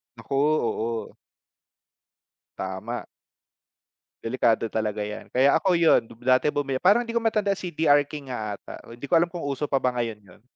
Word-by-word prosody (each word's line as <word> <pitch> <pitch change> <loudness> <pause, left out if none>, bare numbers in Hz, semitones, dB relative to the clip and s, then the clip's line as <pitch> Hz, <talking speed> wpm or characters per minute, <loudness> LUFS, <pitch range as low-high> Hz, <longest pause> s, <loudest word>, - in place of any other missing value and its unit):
Naku, 135 - -5
oo. 115 -6 0 1.4
Tama. 95 +6 -5 1.2
Delikado 115 -1 +1
talaga 105 -1 -2
'yan, 105 - -7
kaya 135 +2 +4
ako 185 -3 +3
yun, 165 -1 +5 0.2
dati 130 +3 +4
bumil 140 -3 -2
parang 210 +6 +4
hindi 230 - -6
ko 235 - +1
matandaan 215 -3 +1
CDR 155 -4 +3
King 140 -4 -7
nga 105 -4 -4
ata, - - -11 0.2
hindi 120 +4 -8
ko 175 - -5
alam 170 +1 +4
kung 170 -4 -6
uso 140 +1 -2
pa 135 - +2
ba 125 -1 0
ngayon 115 -3 -2
yun. 100 0 -19
135 Hz, 160 wpm, -25 LUFS, 115-165 Hz, 1.4 s, yun